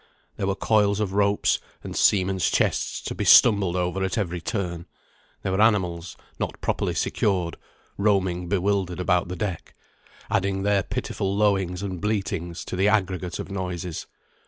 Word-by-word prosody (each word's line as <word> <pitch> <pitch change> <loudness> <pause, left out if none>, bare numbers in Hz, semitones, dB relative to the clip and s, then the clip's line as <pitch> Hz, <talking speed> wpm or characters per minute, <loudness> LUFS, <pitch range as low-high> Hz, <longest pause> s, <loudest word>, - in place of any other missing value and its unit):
There 95 - -2
were 100 - 0
coils 105 -1 +2
of 100 -3 -1
ropes 100 0 +2 0.2
and - - -7
seamen's 95 -1 +3
chests - - 0
to - - -4
be - - -3
stumbled 100 -6 +6
over 90 +1 -1
at 95 +3 -1
every 90 -5 -2
turn; 85 -3 -3 0.6
there 95 - -1
were 95 +2 +1
animals, 90 -6 +1 0.2
not - - -3
properly - - -1
secured, 90 -5 0 0.4
roaming 95 -4 +1
bewildered 95 -2 0
about 90 0 +1
the 90 - -5
deck, 95 -5 -5 0.5
adding 95 -1 0
their 100 -1 +3
pitiful 95 +2 -3
lowings 95 -3 +1
and 95 -3 -4
bleatings 95 -5 -2
to - - -5
the 95 +2 +2
aggregate 95 -4 0
of - - -6
noises. 90 -3 -4
95 Hz, 155 wpm, -25 LUFS, 90-100 Hz, 0.6 s, stumbled